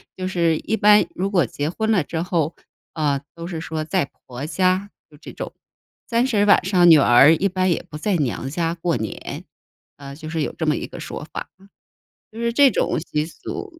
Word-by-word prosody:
就 185 0 -4
是， 170 -4 +1
一 220 - -2
般 210 -1 +5
如 195 +2 -2
果 175 -8 +2
结 145 +6 -3
婚 220 +5 -1
了 185 -8 +3
之 160 +2 -4
后， 165 -3 -1 0.4
呃， 145 -3 0
都 170 0 -7
是 165 -2 -5
说 160 -1 -4
在 165 -2 -1 0.2
婆 130 +3 -6
家 185 +3 +1 0.2
就 150 - -16
这 - - -11
种。 - - -7 0.6
30 230 -3 +2
晚 205 - +5
上， 180 -3 +5
女 160 - +9
儿 135 +3 +6
一 195 - +1
般 185 0 0
也 170 - -1
不 150 - -8
在 200 +2 0
娘 135 -3 -2
家 165 +2 -1
过 170 -2 -1
年。 110 -2 -6 0.5
呃， 140 -1 -9
就 155 +1 -8
是 165 -1 -2
有 - - -2
这 160 - -2
么 155 - +2
一 - - -4
个 175 - -10
说 155 - -7
法， - - -5 0.8
就 225 - -10
是 235 0 0
这 275 0 +6
种 - - 0
习 150 -2 -2
俗…… 330 - -8
170 Hz, 220 characters per minute, -22 LUFS, 155-195 Hz, 0.8 s, 女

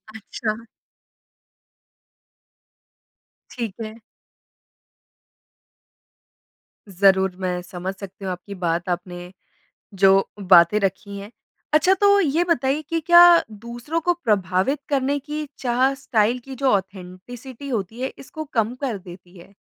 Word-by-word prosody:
अच्छा। 220 +1 -5 2.9
ठीक 230 -6 -5
है। 220 +1 -9 2.9
ज़रूर 190 0 +3
मैं 180 -1 -2
समझ 180 +1 -6
सकती 195 0 -10
हूँ, 190 - -2
आपकी 180 +3 -8
बात 175 -1 -2
आपने 175 0 -5 0.6
जो 195 0 +4
बातें 185 0 +5
रखी 200 +1 -3
हैं। 200 +2 -10 0.4
अच्छा 310 +5 +5
तो 405 0 +5
ये 330 -2 +2
बताइए 290 -4 0
कि 330 - 0
क्या 345 0 +9 0.3
दूसरों 235 +9 -5
को 350 +2 +2
प्रभावित 195 +4 +1
करने 280 0 +1
की 300 +2 -5
चाह 255 +2 +1
स्टाइल 240 -3 0
की 270 -1 -8
जो 270 +1 +1
ऑथेंटिसिटी 200 +8 -5
होती 225 0 -4
है 260 - -3
इसको 310 +3 -8
कम 225 0 +1
कर 255 -7 -2
देती 180 0 -14
है? 175 +3 -16
215 Hz, 115 wpm, -22 LUFS, 190-265 Hz, 2.9 s, क्या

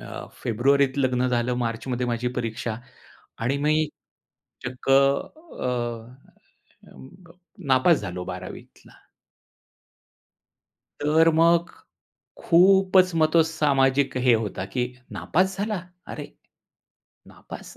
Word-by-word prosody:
अ, - - -8 0.2
फेब्रुवारीत 135 +4 +2
लग्न 125 -1 +1
झालं, 125 0 0
मार्चमध्ये 120 +2 -3
माझी 120 +1 -1
परीक्षा 115 -1 -3 0.6
आणि 125 +5 -1
मी 150 +2 +1 0.9
चक्क 125 +1 -8
अ, 140 - +1 1.2
अं, 130 - -14 0.6
नापास 135 +5 +4
झालो 90 -2 -6
12वी - - -7
तला. - - -20 2.0
तर 155 +3 +3
मग 170 +1 +3 0.7
खूपच 185 +1 +4
मग 155 -1 +2
तो 165 -1 +6
सामाजिक 140 -4 +1
हे 120 - +7
होता 105 -4 -2
की 125 -1 +1 0.3
"नापास 190 +3 -1
झाला!? 205 -2 -2 0.3
अरे, - - -8 1.0
नापास - - -12
135 Hz, 100 wpm, -24 LUFS, 125-165 Hz, 2.0 s, हे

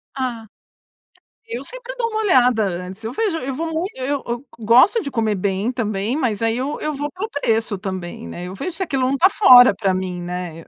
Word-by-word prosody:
Ah! 245 -4 -3 1.0
Eu 460 +1 -5
sempre - - -7
dou 465 -2 0
uma 435 0 -2
olhada 250 - +4
antes. 185 +3 -5
Eu 225 - -4
vejo 380 - -1
eu 270 -1 -4
vou 325 +5 -3
muito 325 +5 -3
eu 275 +2 -2
eu 240 +3 -4
gosto 250 - +5
de 280 -7 -5
comer 220 -3 0
bem 200 +5 -1
também, 215 0 -2
mas 240 -9 -1
aí 225 0 +1
eu 270 +4 -3
eu 305 0 -2
vou 290 +1 -4
pelo 415 +5 -5
preço 225 - 0
também, 185 - -6
né? 175 - -7
Eu 185 - -8
vejo 365 - -4
se - - -7
aquilo 275 -7 -1
não 260 - +1
está 370 +8 +5
fora 250 - +7
para 195 -2 0
mim, 185 -1 -3
né? 175 -2 -6
245 Hz, 215 wpm, -20 LUFS, 200-300 Hz, 1.0 s, fora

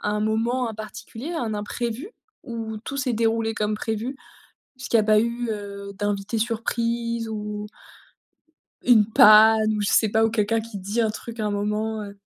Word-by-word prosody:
un 210 0 -1
moment 230 +3 0
en 220 - -6
particulier, 225 +6 -7
un 235 -10 -2
imprévu 235 - -4 0.3
ou 225 -3 -5
tout 255 +5 -7
s'est 260 -3 -1
déroulé 225 0 0
comme 210 0 -1
prévu? 225 +5 -3 0.6
Est-ce 255 - -7
qu’il - - +3
y - - +6
a 210 - -1
pas 215 0 +5
eu, 235 +1 -2
heu, 200 -1 -6
d'invité 205 +2 -2
surprise, 230 0 -1
ou 210 -1 -5 1.2
une 230 -4 +6
panne, 215 +1 +7
ou 210 - -2
je 205 - 0
sais 220 - +4
pas, 220 +2 +2
ou 225 - +2
quelqu'un 225 0 +1
qui 220 -2 -8
dit 200 +5 -2
un 220 -2 +2
truc 230 +1 -8
à 215 - 0
un - - 0
moment, 210 +2 -2
heu? 200 -1 -9
220 Hz, 185 wpm, -24 LUFS, 210-230 Hz, 1.2 s, panne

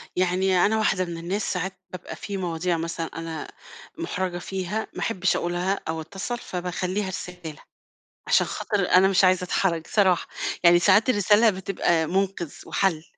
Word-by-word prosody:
يعني 185 0 +2
أنا 220 +2 +2
واحدة 195 -4 +1
من 170 -1 -6
الناس 190 +6 -2
ساعات 180 +1 -3 0.2
بابقى 180 -2 -7
في 200 -1 -5
مواضيع 175 -1 -1
مثلًا 165 0 -3
أنا 165 -1 -6 0.5
مُحرجة 180 -1 -3
فيها، 190 +4 -3
ما - - -7
أحبّش 185 -4 0
أقولها 175 +3 -1
أو 160 0 -2
أتّصل، 195 +8 -5
فباخلّيها 185 +1 -3
رسالة، 180 -3 -7 0.7
عشان - - +4
خاطر 200 -4 -1
أنا 185 +1 +6
مش 195 0 +3
عايزة 185 0 +4
أتحرج 170 -3 0
صراحة. 190 -5 +2 0.4
يعني 175 0 +7
ساعات 205 +7 +4
الرسالة 210 +1 +5
بتبقى 180 -4 0
مُنقِذ 185 -3 -1
وحَل، 170 -5 0
185 Hz, 150 wpm, -25 LUFS, 175-195 Hz, 0.7 s, يعني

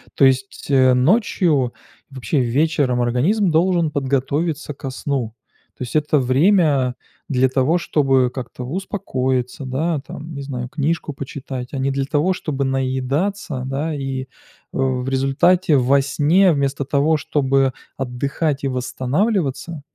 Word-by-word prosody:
То - - +2
есть, 130 0 0
э, 130 -2 +5
ночью, 150 - +2 0.4
вообще 135 +2 -2
вечером 130 0 +1
организм 165 - +2
должен 170 0 +2
подготовиться 145 +3 -1
ко 135 0 -6
сну. 130 -3 -3 0.4
То - - -5
есть 125 - -7
это 150 0 +2
время 135 -1 +3 0.3
для 130 -1 +2
того, 135 +6 +2
чтобы 135 -7 +2
как-то 125 -1 -6
успокоиться, 130 -6 -2
да 150 +5 -1
там, 155 +3 -9
не 140 - -6
знаю, 125 -3 -5
книжку 150 +2 -1
почитать, 135 -2 -7
а - - -3
не 135 +1 0
для 135 0 -1
того, 150 +6 +1
чтобы 145 -6 -3
наедаться, 135 +5 -1
да, 140 +4 -2
и. 135 -2 -3
Э, - - -7 0.5
в 130 -1 0
результате 140 +6 +3
во 135 +2 +4
сне, 160 +7 +3
вместо 140 -1 -1
того, 145 +3 +2
чтобы 135 -3 +1 0.2
отдыхать 140 +3 -2
и - - +1
восстанавливаться, 145 - -1
140 Hz, 135 wpm, -20 LUFS, 130-155 Hz, 0.5 s, э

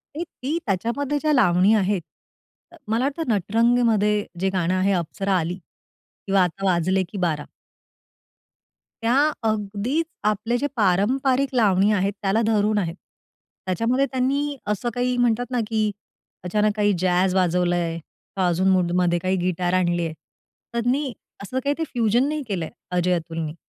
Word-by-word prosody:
ते 330 - -2
ती 315 -2 -4
त्याच्यामध्ये 235 +9 -1
ज्या 305 -1 +2
लावणी 190 -5 +4
आहेत, 200 -2 +1 0.9
मला 225 +3 +1
वाटतं, 290 +4 -2
नटरंगमध्ये 220 +1 +2 0.2
जे 190 +1 +1
गाणं 180 0 +1
आहे, 185 +2 +2
अप्सरा 195 +4 -2
आली 170 +3 -3 0.7
किंवा 195 -1 +4
आता 180 +2 -3
वाजले 185 +2 +1
की 205 - -6
बारा. 150 -3 -2 1.6
त्या 230 +2 +2 0.3
अगदीच 215 +9 -1 0.2
आपले 215 +3 0
जे 285 +4 -1
पारंपरिक 255 +7 +2
लावणी 205 -3 +4
आहेत, 200 0 +1
त्याला 200 +3 +1
धरून 215 -1 +2
आहेत. 170 -4 -1 0.7
त्याच्यामध्ये 230 +9 +1
त्यांनी 280 +3 0
असं 210 +3 -1
काही 250 0 0
म्हणतात 245 0 +2
ना, 250 - 0
की 215 -1 0 0.5
अचानक 210 +3 +1
काही 205 -1 +2
जॅझ 180 +1 +2
वाजवलंय 175 -2 +1 0.4
का, 190 -2 +1
अजून 175 +2 +1
मूडमध्ये 180 -1 +2
काही 185 +2 0
गिटार 180 0 -1
आणली 175 -2 +1
आहे. 160 - -4 0.6
त्यांनी 250 +4 0 0.3
असं 255 +6 -3
काही 285 - +1
ते 325 - -1
फ्युजन 240 +2 +2
नाही 305 0 -2
केलंय, 175 -7 -3 0.2
अजय-अतुलनी. 165 -3 -1
205 Hz, 140 wpm, -23 LUFS, 180-245 Hz, 1.6 s, लावणी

